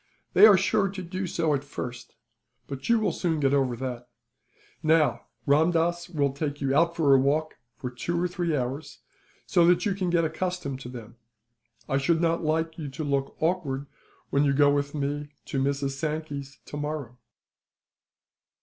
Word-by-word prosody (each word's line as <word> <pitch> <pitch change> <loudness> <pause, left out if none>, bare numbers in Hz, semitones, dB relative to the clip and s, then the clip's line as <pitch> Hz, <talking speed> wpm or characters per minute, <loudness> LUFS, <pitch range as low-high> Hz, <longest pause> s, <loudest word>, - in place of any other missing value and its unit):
"They 215 - +9
are 205 -3 +7
sure 200 +1 +2
to 190 -1 -6
do 185 +2 -4
so, 165 -3 0
at 140 -1 -1
first; 125 -3 -7 0.5
but 135 - -7
you 235 -1 +5
will 210 -4 +1
soon 165 -2 -1
get 140 -1 +2
over 135 -3 +2
that. 125 0 -5 0.7
Now, 155 -5 +2 0.2
Ramdass 165 +3 +2
will 145 -5 +1
take 145 +1 -3
you 135 -1 0
out 170 +2 +3
for 150 -5 +4
a 135 - +6
walk 150 +4 0 0.2
for 125 - -5
two 170 +8 -2
or 180 - +1
three 175 -3 -1
hours, 130 +4 -4 0.4
so 175 -3 +3
that 175 0 +4
you 205 - +1
can 185 -2 -2
get 170 -1 +2
accustomed 160 -4 -3
to 125 - -8
them. 120 -2 -10 0.7
I 135 - +1
should 165 +4 +2
not 165 0 +1
like 160 +1 -1
you 150 -3 -4
to 135 +4 -5
look 140 -2 -1
awkward, 155 -5 -1 0.5
when 140 - +3
you 140 -1 +3
go 145 +1 +5
with 145 +1 -1
me 145 +1 -3
to 135 - -2
Mrs. 140 0 0
Sankey's, 145 -1 -4
tomorrow." 145 -5 -5
150 Hz, 175 wpm, -27 LUFS, 140-170 Hz, 0.7 s, They